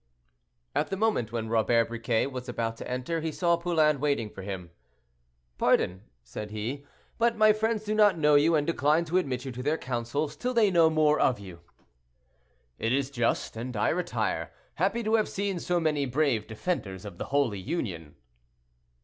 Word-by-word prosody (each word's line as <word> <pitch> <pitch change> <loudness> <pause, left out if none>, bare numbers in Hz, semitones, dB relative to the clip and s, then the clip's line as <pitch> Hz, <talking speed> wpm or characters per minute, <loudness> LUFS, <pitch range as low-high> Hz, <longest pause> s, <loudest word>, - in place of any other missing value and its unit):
At - - 0
the 195 - -3
moment 210 - 0
when 115 -1 -3
Robert 115 +1 +2
Briquet 115 0 0
was 130 -2 -6
about 115 -1 -2
to - - -7
enter, 125 +7 -2
he 160 0 -2
saw 170 +2 +2
Poulain 160 -4 +2
waiting 140 -7 0
for 95 - -9
him. 95 -3 -6 0.9
"Pardon," 90 +1 +2 0.2
said 105 - -7
he, 120 +7 -5 0.3
"but 230 0 +2
my 215 0 +6
friends 220 0 -1
do 215 0 -2
not 210 -4 +4
know 150 -1 +4
you, 150 +3 +5
and 150 -1 +2
decline 160 +1 +2
to 175 +3 +2
admit 130 -7 -3
you 130 - -4
to 125 +1 -6
their 150 +4 0
councils 130 +4 -3
till 250 +10 -3
they 215 -4 +4
know 165 -2 +5
more 155 -1 +3
of 125 -5 +2
you." 95 -4 -10 1.2
"It 115 - 0
is 135 +1 0
just, 120 -4 -1
and 120 +1 -5
I - - +2
retire, - - -1 0.2
happy 200 +7 0
to 220 +1 -1
have 220 -2 +3
seen 195 -2 -2
so 175 +1 0
many 150 -4 0
brave 125 -5 +1
defenders 105 - -3
of 95 -4 -9
the - - -3
Holy 135 -8 0
Union." 95 - -4
140 Hz, 185 wpm, -28 LUFS, 115-170 Hz, 1.2 s, my